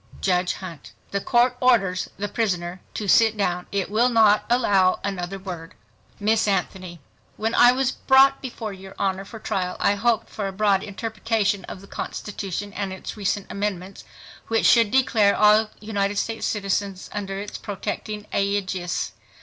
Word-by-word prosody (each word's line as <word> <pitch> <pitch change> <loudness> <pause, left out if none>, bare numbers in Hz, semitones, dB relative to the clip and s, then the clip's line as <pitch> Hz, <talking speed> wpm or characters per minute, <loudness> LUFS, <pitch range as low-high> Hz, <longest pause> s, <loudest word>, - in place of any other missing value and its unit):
JUDGE 180 -1 +1
Hunt—The 185 +2 -7
Court 245 +3 +3
orders 195 -8 +2
the 205 +2 -2
prisoner 180 -5 -2
to 210 - -3
sit 220 +2 +5
down. 180 -3 -1
It 200 -1 -2
will 235 +4 +3
not 220 -3 +4
allow 200 -6 +3
another 195 -1 -3
word. 180 -4 -8 0.4
Miss 215 +1 +2
ANTHONY—When 190 +3 -4
I 245 0 +7
was 260 0 +1
brought 270 +1 +4
before 230 -5 -6
your 190 0 -11
Honor 195 0 -1
for 225 - -10
trial 180 -4 -3
I - - +3
hoped 225 +2 +1
for 205 -2 -4
a - - -4
broad 195 0 +2
interpretation 215 -1 -1
of 185 - -9
the 200 - -14
constitution 200 -1 -5
and 195 -1 -3
its 190 - -7
recent 205 -1 -1
amendments, 195 -2 -4 0.4
which 225 0 +1
should 230 -3 +6
declare 225 -5 +3
all 215 +1 +5
United 205 -1 -2
States 225 +2 -2
citizens 195 -2 -2
under 195 -1 -4
its 205 +1 -6
protecting 210 +1 -5
aegis 190 -3 -1
200 Hz, 150 wpm, -23 LUFS, 190-220 Hz, 0.4 s, I